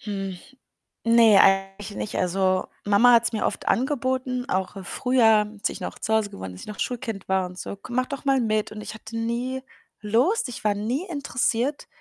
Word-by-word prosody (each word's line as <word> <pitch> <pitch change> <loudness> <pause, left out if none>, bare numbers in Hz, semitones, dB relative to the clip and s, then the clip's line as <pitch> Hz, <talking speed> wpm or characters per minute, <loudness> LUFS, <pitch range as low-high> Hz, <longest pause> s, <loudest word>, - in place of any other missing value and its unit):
Hm, 195 -3 -4 0.7
ne, 230 -3 +6
eigentlich 195 +1 +2
nicht. 215 - -4
Also, 185 +1 +1 0.2
Mama 205 +5 +5
hat's 235 0 +4
mir 215 - -1
oft - - -3
angeboten, 255 -1 0
auch 190 +1 -2
früher, 225 -3 +3
als - - 0
ich - - -8
noch - - -6
zu 220 - -1
Hause 220 -2 +2
gewohnt 95 - -8
habe, 95 - -7
als 90 - -11
ich - - -10
noch 210 - -6
'n - - -18
Schulkind 230 -5 -4
war 190 -1 +2
und 180 0 -9
so: - - -5
„Komm, 240 +5 -9
mach 255 0 +2
doch 280 0 -6
mal 270 -1 +3
mit“, 215 -3 0
und 215 - -7
ich 210 - -7
hatte 220 +1 -8
nie 240 +3 -2 0.4
Lust, 250 - +1
ich 245 - -8
war 210 -1 +3
nie 240 - -2
interessiert. 280 -3 -1
220 Hz, 205 wpm, -24 LUFS, 200-250 Hz, 0.7 s, ne